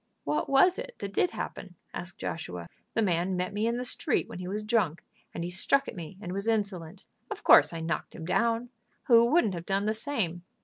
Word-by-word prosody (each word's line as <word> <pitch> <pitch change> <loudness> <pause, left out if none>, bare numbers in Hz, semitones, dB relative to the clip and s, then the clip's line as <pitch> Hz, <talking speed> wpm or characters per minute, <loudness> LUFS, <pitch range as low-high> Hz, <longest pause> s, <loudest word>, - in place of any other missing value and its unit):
"What 300 - -1
was 350 +9 +5
it - - -7
that 200 0 -6
did 355 - +2
happen?" 185 - -6 0.2
asked 175 0 -5
Joshua. 90 - -5 0.3
"The 225 - +3
man 180 0 +1
met 180 +2 -2
me 210 +2 0
in 235 +1 0
the 250 - -2
street 250 - 0
when - - -8
he 180 - -5
was 210 +3 -3
drunk, 210 -8 +1 0.3
and 170 - -5
he 175 - -3
struck 275 +9 +2
at - - -6
me 175 +1 -8
and 180 -3 -6
was 200 +3 -3
insolent. 200 -7 -2 0.2
Of - - -6
course - - +7
I 165 - -5
knocked 165 +1 -3
him 160 - -7
down. 230 +6 +1 0.3
Who 235 -2 +6
wouldn't 240 - +3
have 170 -1 -6
done 195 +1 +1
the 215 - +1
same? 215 - -2
200 Hz, 220 wpm, -29 LUFS, 175-230 Hz, 0.3 s, course